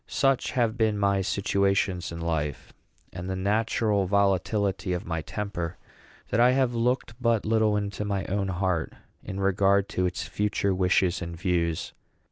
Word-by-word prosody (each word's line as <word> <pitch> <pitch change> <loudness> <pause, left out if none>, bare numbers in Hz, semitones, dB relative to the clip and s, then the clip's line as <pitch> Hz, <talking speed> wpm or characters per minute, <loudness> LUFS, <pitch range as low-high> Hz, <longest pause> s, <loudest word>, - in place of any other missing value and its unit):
Such 135 -2 +1
have 120 -2 +1
been 110 -2 +2
my 100 -1 +2
situations 100 -2 0
in 85 - -6
life, 75 -4 -3 0.4
and 90 +2 -6
the 95 - -1
natural 105 0 +1
volatility 100 0 +1
of 90 - -3
my 80 -1 -2
temper, 90 -1 -4 0.5
that 105 - +1
I 125 +1 +6
have 130 -2 +2
looked 120 0 0
but 115 -3 +2
little 110 -1 +2
into 100 0 -3
my 100 -2 -2
own 100 +1 -1
heart 90 -3 -1 0.3
in 95 - -5
regard 100 0 +3
to 90 0 0
its 90 - -4
future 100 -1 0
wishes 90 0 +2
and 85 -1 -5
views. 85 -2 -1
100 Hz, 155 wpm, -27 LUFS, 90-105 Hz, 0.5 s, I